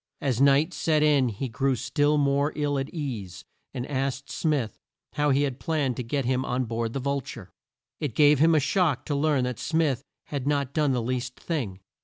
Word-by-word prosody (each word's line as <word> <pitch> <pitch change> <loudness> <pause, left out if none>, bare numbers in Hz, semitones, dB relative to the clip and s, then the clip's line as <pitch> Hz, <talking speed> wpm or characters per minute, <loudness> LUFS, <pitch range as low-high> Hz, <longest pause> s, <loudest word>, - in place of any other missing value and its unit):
As 130 -3 0
night 140 +5 +4
set 155 -2 +1
in 145 -4 +4
he 115 +5 -4
grew 135 +3 0
still 145 +5 +1
more 140 +1 +2
ill 145 -2 0
at 135 +1 -3
ease, 110 - -5 0.3
and 125 -2 -4
asked 135 -1 -3
Smith 140 - -1 0.3
how 145 0 +1
he 140 +1 +3
had 135 -2 -2
planned 145 -6 0
to - - -2
get 135 +3 -2
him 130 +1 +1
on 125 0 -1
board 115 0 -3
the 135 - -2
Vul 140 +1 -1
ture. 115 -6 -10 0.5
It 145 -7 -3
gave 150 -2 +5
him 160 +2 +5
a - - +5
shock 150 -1 +1
to 145 - -1
learn 145 -2 +2
that 125 -2 -3
Smith 155 -6 +1 0.3
had 140 -2 -3
not 140 -2 0
done 150 -3 +2
the 120 -2 0
least 125 +1 -3
thing. 115 - -3
140 Hz, 205 wpm, -26 LUFS, 125-150 Hz, 0.5 s, gave